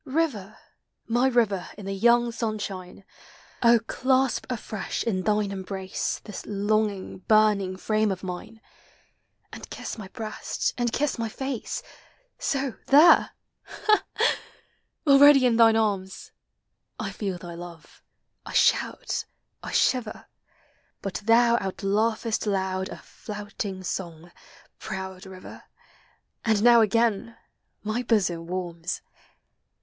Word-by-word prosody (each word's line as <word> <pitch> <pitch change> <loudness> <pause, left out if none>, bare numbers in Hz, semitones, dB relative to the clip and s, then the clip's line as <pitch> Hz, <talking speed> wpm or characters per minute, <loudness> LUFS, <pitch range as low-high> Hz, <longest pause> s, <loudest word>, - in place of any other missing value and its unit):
River! 260 - -2 0.5
my 240 +3 +2
river 220 -7 +1
in 205 - -9
the 195 - -3
young 235 +4 +3
sunshine! 205 -5 -5 0.6
Oh, 235 0 +6
clasp 260 +1 +1
afresh 215 -4 -4
in 195 -5 -1
thine 210 0 +1
embrace 190 -1 -4
This 210 - -8
longing, 205 -1 -1
burning 205 -2 +3
frame 215 +1 +1
of 190 0 -5
mine, 190 +5 -7 0.9
And - - -9
kiss - - -6
my 200 - -7
breast, 215 +1 -3
and 240 -1 0
kiss 285 -1 -1
my 225 -1 -1
face! 265 0 -4 0.6
So 270 -4 -1
— - - -36
there! 300 +5 +6 0.2
— - - -54
Ha, 425 -1 +1
ha! - - +3 0.4
— - - -46
already 280 -1 +8
in 235 -2 +3
thine 225 -1 +6
arms! 200 -4 -1 0.7
I 210 -3 -3
feel 195 -2 -4
thy 175 0 -9
love 170 -1 -11 0.2
— - - -52
I - - -9
shout - - +1 0.2
— - - -52
I - - -7
shiver; 245 -4 +1 0.8
But 195 -1 -4
thou 235 +1 +5
outlaughest 215 +3 -1
loud 190 -1 -1
a - - -7
flouting 205 -2 -7
song, 175 -2 -5 0.5
proud 190 0 -6
river, 185 -1 -11 0.8
And 220 -3 +2
now 240 -1 +7
again 230 0 +1 0.5
my 215 +3 -1
bosom 185 -8 0
warms! 175 -1 -4
215 Hz, 125 wpm, -26 LUFS, 190-235 Hz, 0.9 s, already